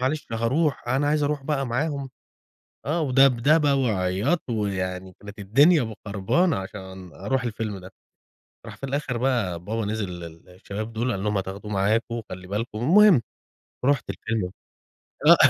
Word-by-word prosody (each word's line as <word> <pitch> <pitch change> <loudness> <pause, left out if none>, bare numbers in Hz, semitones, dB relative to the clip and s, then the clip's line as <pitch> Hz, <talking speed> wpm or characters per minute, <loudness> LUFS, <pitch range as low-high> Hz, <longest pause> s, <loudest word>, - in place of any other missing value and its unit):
معلش 145 +4 -1
هاروح. 125 +4 0
أنا 135 +3 +1
عايز 150 0 +2
اروح 145 -1 0
بقى 135 -2 -1
معاهم. 140 +2 -2 0.8
آه، 160 +4 0
ودَبدَبة، 140 +2 +4
وعِياط، 110 - +1
ويعني 95 -4 -2
كانت 105 +1 -11
الدنيا 140 - +5
م 110 - -6
خربانة 110 - +1
عشان 95 -2 -8
أروح 120 +6 -1
الفيلم 110 -3 -3
ده. 95 +1 -11 0.8
راح - - -9
في - - -9
الآخر 135 -2 -2
بقى، 115 -9 0
بابا 110 +2 -2
نزل 105 -1 -2
للشباب 90 +5 -8
دول، 120 +3 -1
قال 100 -2 -2
لهم: 105 -1 +1
"هتاخدوه 95 +2 -5
معاكم، 110 +4 +1
وخلّي 95 -5 -7
بالكم." 105 +3 -3
والمهم، 175 - +6 0.6
رُحت 140 0 +2
الفيلم 110 -5 -2 0.8
آه - - +10
115 Hz, 145 wpm, -25 LUFS, 100-135 Hz, 0.8 s, آه